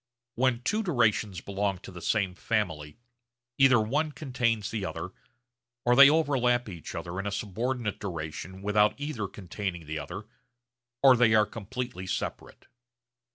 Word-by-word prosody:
When 125 -1 +1
two 215 +8 +1
durations 110 - +1
belong 100 -1 -1
to - - -9
the 90 -1 -9
same 95 +1 0
family 80 -8 -2 0.6
either 135 -3 +6
one 145 +8 0
contains 125 -8 -1
the 110 -3 -3
other, 95 - -5 0.7
or 120 0 +5
they 140 +2 +10
overlap 130 -6 +2
each 85 -6 -8
other 85 +2 -5
in 100 - -3
a - - -2
subordinate 110 +2 -2
duration 90 +1 -6
without 105 +1 +3
either 145 -8 -3
containing 90 -3 -5
the 80 +1 -4
other; 80 +8 -7 0.8
or 135 -2 +8
they 115 -2 +4
are 105 -1 +5
completely 115 -3 -6
separate. 95 - -5
105 Hz, 145 wpm, -28 LUFS, 95-125 Hz, 0.8 s, they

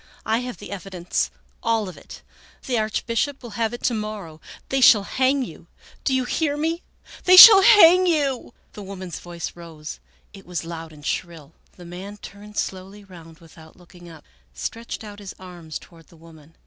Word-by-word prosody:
I 225 +1 +1
have 250 -5 -6
the 175 - -11
evidence, 185 -3 -3 0.3
all 225 -3 0
of 185 - -9
it. - - -13 0.4
The 245 -3 0
Archbishop 230 +5 -2
will 240 - -9
have 225 +1 -1
it 240 - -8
to 245 - +1
morrow. 210 -8 -6 0.3
They 270 0 0
shall 210 -5 +7
hang 260 +4 0
you! - - -13 0.4
Do 265 - +1
you 260 -1 0
hear 290 +2 -1
me? 325 +3 -2 0.4
They 365 0 +7
shall 405 0 +12
hang 370 -2 +7
you! 285 -8 0
" - - -39
The 210 - -9
woman's 190 -3 -8
voice 175 -1 -7
rose, 165 -3 -10 0.3
it 195 -2 -14
was 175 -2 -4
loud 165 -1 -8
and 150 -1 -15
shrill. 165 -3 -5 0.2
The 175 - -14
man 190 +4 -9
turned 210 +1 -12
slowly 190 +2 -5
round 165 -4 -15
without 160 -1 -17
looking 175 -1 -16
up, 160 -3 -14
and - - -32
stretched 230 0 -6
out 205 -1 -10
his 200 -2 -9
arms 175 -4 -9
toward 165 -2 -18
the 170 - -20
woman. 160 -1 -18
200 Hz, 185 wpm, -22 LUFS, 170-245 Hz, 0.4 s, shall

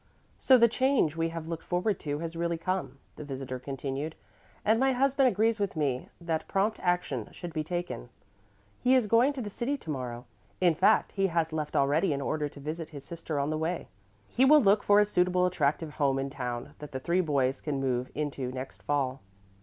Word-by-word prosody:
"So 260 - +6
the 235 -1 +6
change 255 - +2
we 165 0 0
have 165 -1 -6
looked 165 -1 -4
forward 180 +3 0
to 145 -1 -3
has 165 0 -6
really 170 0 -1
come," 185 -3 -3 0.2
the - - -6
visitor 135 -2 -5
continued, 140 +3 -4 0.5
"and 220 +2 +4
my 265 0 +3
husband 270 +1 +3
agrees 225 0 +1
with 200 -3 -1
me 140 -5 -1
that 165 -2 -2
prompt 205 +3 0
action 175 -10 -1
should 175 -2 -8
be 155 - -1
taken. 175 -6 -4 0.7
He 255 +1 +4
is 255 -4 +4
going 230 +6 +4
to 260 -3 -4
the 205 - -5
city 270 +7 -2
to 160 - -6
morrow; 125 -3 -5 0.3
in 175 -2 +4
fact, 195 +7 +3
he 195 -1 +1
has 165 -2 0
left 155 -1 -3
already 150 +5 +3
in 140 - -2
order 150 +1 -1
to 145 - -13
visit 155 +3 -5
his 145 -4 -10
sister 165 -2 -5
on 140 +2 0
the 155 - -1
way. 165 +2 -2 0.4
He 250 - +1
will 300 +3 +8
look 205 -2 +4
for 205 0 +5
a 210 - +5
suitable, 180 -2 +2
attractive 155 -3 0
home 140 -3 +1
in 135 0 -2
town 125 0 -5
that 150 -1 -9
the 130 - -2
three 170 +7 +1
boys 140 -5 0
can 145 -3 -2
move 130 -1 -1
into 140 -4 -3
next 130 +1 -7
fall." 135 -2 -1
160 Hz, 210 wpm, -29 LUFS, 140-195 Hz, 0.7 s, will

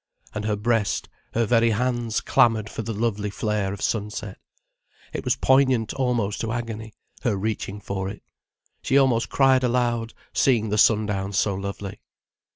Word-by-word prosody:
And 110 -1 -4
her 105 -1 +1
breast, 105 0 0 0.3
her 115 0 +3
very 115 0 +4
hands, 120 0 0
clamoured 110 -2 +3
for - - -4
the 115 - -4
lovely 105 -1 -1
flare 105 -1 -1
of 100 - -6
sunset. 105 -2 -3 0.7
It - - -3
was - - +1
poignant 130 -4 +3
almost 120 -6 0
to 115 - -2
agony, 110 -2 -5 0.3
her 115 -6 0
reaching 105 0 -3
for 95 -1 -3
it. 105 - -9 0.6
She 135 - +2
almost 130 -4 +3
cried 135 -1 +4
aloud 120 -2 0 0.2
seeing 115 -5 +2
the 105 +1 +1
sundown 105 -3 +2
so 100 0 +2
lovely. 100 +1 -6
110 Hz, 155 wpm, -24 LUFS, 105-120 Hz, 0.7 s, very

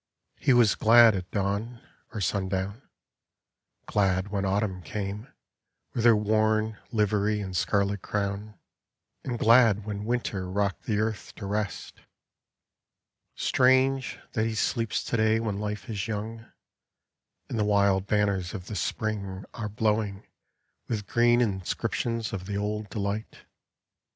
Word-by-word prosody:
He 140 - +2
was 120 -4 +5
glad 115 0 +7
At 90 -1 -5
dawn 105 +4 -2 0.3
or 110 - -5
sundown; 95 +3 -1 1.0
glad 95 -1 +1
when 100 -1 -1
Autumn 95 -1 0
came 100 - -5 0.7
With 120 - -1
her 115 -2 +8
worn 110 +1 +1
livery 105 -1 +1
and 95 -3 -5
scarlet 100 +4 +1
crown. 105 +1 -3 0.7
And 125 -2 -3
glad 115 -3 +5
when 105 -1 -4
Winter 110 -6 -2
rocked 100 +1 -1
the 105 - 0
earth 110 0 -2
to 100 - -7
rest. 105 0 -3 1.4
Strange 130 +1 +2
that 110 -2 0
he 110 - -3
sleeps 115 +1 0
to 120 - -1
day 110 0 +3
when 105 -3 -2
Life 105 -1 -4
is 105 -2 -3
young, 110 +2 -5 1.0
And 115 - -3
the - - +3
wild 100 -2 +2
banners 100 -3 0
of 90 -3 -6
the 105 - -6
Spring 100 +1 -3
are 105 -3 -4
blowing 105 -1 -1 0.6
With 105 -3 -3
green 120 +3 +3
inscriptions 110 +2 -2
of 95 -1 -5
the 100 -1 -2
old 105 0 -3
delight." 100 +1 -4
105 Hz, 130 wpm, -27 LUFS, 100-110 Hz, 1.4 s, her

